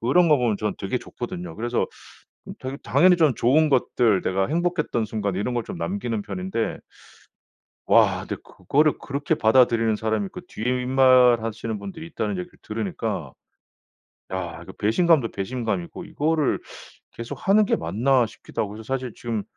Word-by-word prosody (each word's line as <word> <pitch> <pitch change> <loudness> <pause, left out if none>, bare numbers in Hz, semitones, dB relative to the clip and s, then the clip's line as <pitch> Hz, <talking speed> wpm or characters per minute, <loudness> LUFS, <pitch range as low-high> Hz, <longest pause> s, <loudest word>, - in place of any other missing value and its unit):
그런 165 +9 +4
거 150 - +6
보면 120 -4 +1
저는 105 -1 -2
되게 100 +6 -2
좋거든요. 175 +11 -7
그래서 120 +2 -1 0.6
음 - - -6
되게 130 +1 -5
당연히 180 0 +5
저는 155 -7 +3
좋은 150 +6 +4
것들 120 -6 +2
내가 95 +1 0
행복했던 170 -7 0
순간 105 -2 -2
이런 105 +6 -2
걸 120 -2 -1
좀 - - -6
남기는 100 +6 -2
편인데 95 +3 -3 1.1
와 - - +5
근데 - - -3
그거를 145 - +1
그렇게 145 +3 -2
받아들이는 115 -1 +4
사람이 110 -1 -1
있고 180 - -8
뒷말하시는 125 -3 +2
분들이 100 +12 -8
있다는 105 - -3
얘기를 90 -1 -7
들으니까 105 -3 -4 1.0
야 90 -3 -4
이거 - - -10
배신감도 135 - +3
배신감이고 100 -4 -3
'이거를 155 -1 0 0.5
계속하는 195 - +1
게 - - +2
맞나.' 120 +10 +2
싶기도 110 - -6
하고 100 - -5
그래서 110 +2 -9
사실 125 -3 -5
지금 115 -3 -4
115 Hz, 360 characters per minute, -24 LUFS, 105-135 Hz, 1.1 s, 거